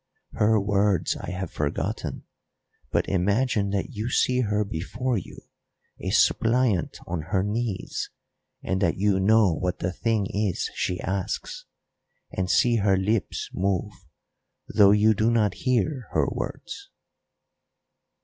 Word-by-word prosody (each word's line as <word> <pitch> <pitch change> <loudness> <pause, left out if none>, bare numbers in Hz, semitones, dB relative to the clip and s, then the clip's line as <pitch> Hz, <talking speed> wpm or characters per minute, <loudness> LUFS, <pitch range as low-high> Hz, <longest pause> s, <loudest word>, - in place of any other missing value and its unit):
Her 110 +1 +3
words 100 -2 +1
I - - -7
have 90 -1 -4
forgotten, 75 -1 -3 0.7
but - - 0
imagine 100 +3 +1
that 100 +6 -2
you 110 -1 -3
see 125 0 +2
her 105 -2 0
before 115 +8 -2
you - - -11 0.6
a - - -3
suppliant 115 -6 +2
on 85 -2 -3
her 95 0 +1
knees, 105 0 -3 0.5
and 95 +2 -1
that 85 -4 +1
you 100 0 +2
know 105 -1 +4
what 90 +3 -2
the 90 - -2
thing 110 +1 0
is 100 -3 -1
she 90 - -2
asks, 95 0 -3 0.7
and 95 -1 -2
see 120 +3 +4
her 100 -2 +3
lips 100 -2 -1
move, 95 +1 -1 0.8
though 100 -2 +5
you 105 +2 +5
do 110 +2 +1
not 110 -5 +2
hear 130 0 -1
her - - +3
words." - - -6
105 Hz, 130 wpm, -25 LUFS, 95-110 Hz, 0.8 s, though